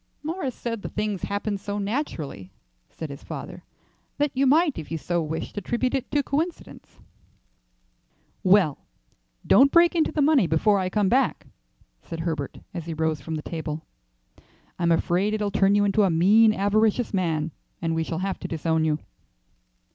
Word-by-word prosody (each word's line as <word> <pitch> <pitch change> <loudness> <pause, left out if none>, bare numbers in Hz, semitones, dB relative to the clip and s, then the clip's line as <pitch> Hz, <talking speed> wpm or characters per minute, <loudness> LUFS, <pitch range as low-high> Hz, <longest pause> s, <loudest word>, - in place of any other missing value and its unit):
"Morris 310 -5 -3
said 230 -3 -4
the - - -5
things 210 -3 -2
happened 205 0 -2
so 205 +1 -4
naturally," 200 - -4 0.4
said 160 -3 -7
his 140 - -10
father, - - -8 0.5
"that 290 -1 +1
you 270 +1 +2
might 305 - +3
if 155 - -8
you 165 - -2
so 175 +2 -1
wished 160 +1 -4
attribute 240 +6 -1
it 265 -2 -2
to 290 -1 +1
coincidence." 320 +6 -4 1.4
"Well, 185 -6 +4 0.7
don't 275 +2 +6
break 340 0 +5
into 325 -3 +1
the 305 -2 +1
money 280 - +4
before 195 +6 +3
I 185 -1 -1
come 205 +1 +1
back," 255 +5 +1 0.6
said 165 -1 -6
Herbert 160 -4 -3 0.2
as 170 -3 -6
he 165 - -4
rose 160 -1 -1
from 160 - -4
the 155 - -5
table. 160 -1 -5 0.9
"I'm 170 -1 +2
afraid 180 +5 +1
it'll 210 -1 -1
turn 195 +1 +3
you 205 0 +3
into 200 +1 +2
a 195 - +4
mean, 205 +7 +5
avaricious 215 +3 +1
man, 165 -4 0 0.3
and 165 -1 -1
we 160 0 0
shall 160 0 -4
have 195 - -3
to - - -5
disown 160 0 0
you." 155 -1 +1
195 Hz, 170 wpm, -25 LUFS, 165-240 Hz, 1.4 s, don't